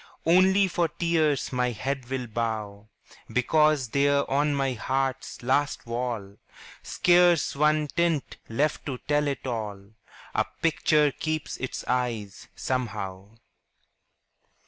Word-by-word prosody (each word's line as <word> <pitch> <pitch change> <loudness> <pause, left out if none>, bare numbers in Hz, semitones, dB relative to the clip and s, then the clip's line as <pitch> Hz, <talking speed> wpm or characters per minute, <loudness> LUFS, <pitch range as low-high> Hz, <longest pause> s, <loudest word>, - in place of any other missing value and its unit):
Only, 190 +4 +5
for 175 -2 +1
tears 155 -4 0
my 125 0 +1
head 130 +2 -4
will 130 -1 -2
bow, 110 -2 -4 0.4
Because 150 0 +2
there 140 +2 +2
on 145 +1 +2
my 135 -2 0
heart's 135 +2 -2
last 145 +4 0
wall, 115 -4 -4 0.4
Scarce 175 -5 +3
one 150 +1 +3
tint 170 -2 -1
left 145 +8 -1
to 130 -3 -3
tell 150 0 +2
it 140 -1 -3
all, 105 -5 -5 0.4
A - - +1 0.2
picture 155 -2 +3
keeps 155 +2 -3
its 130 - -5
eyes, 120 -5 -2
somehow. 105 -5 -4
135 Hz, 115 wpm, -26 LUFS, 115-150 Hz, 0.4 s, Only